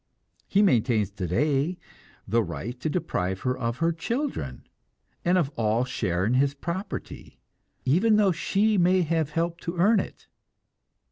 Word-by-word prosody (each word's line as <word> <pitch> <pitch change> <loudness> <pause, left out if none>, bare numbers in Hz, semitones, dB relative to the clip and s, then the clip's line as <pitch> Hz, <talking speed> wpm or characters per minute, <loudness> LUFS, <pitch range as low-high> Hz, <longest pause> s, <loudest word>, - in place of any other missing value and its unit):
He 200 +2 +3
maintains 115 - +2
today 135 - 0 0.5
the 115 +4 +2
right 100 - -5
to 155 - -2
deprive 95 - -2
her 125 0 0
of 115 -1 -3
her 165 0 +2
children, 240 - -3 0.6
and 180 +1 +3
of 160 -6 +1
all 115 +2 +1
share 95 -7 -1
in 115 - +1
his 140 +2 +2
property, 170 +6 -6 0.5
even 190 - +4
though 205 -2 +4
she 200 +5 +1
may 180 +1 +4
have 160 -2 0
helped 170 +2 -2
to 170 +1 -3
earn 205 +5 +4
it. - - -7
155 Hz, 145 wpm, -26 LUFS, 115-180 Hz, 0.6 s, even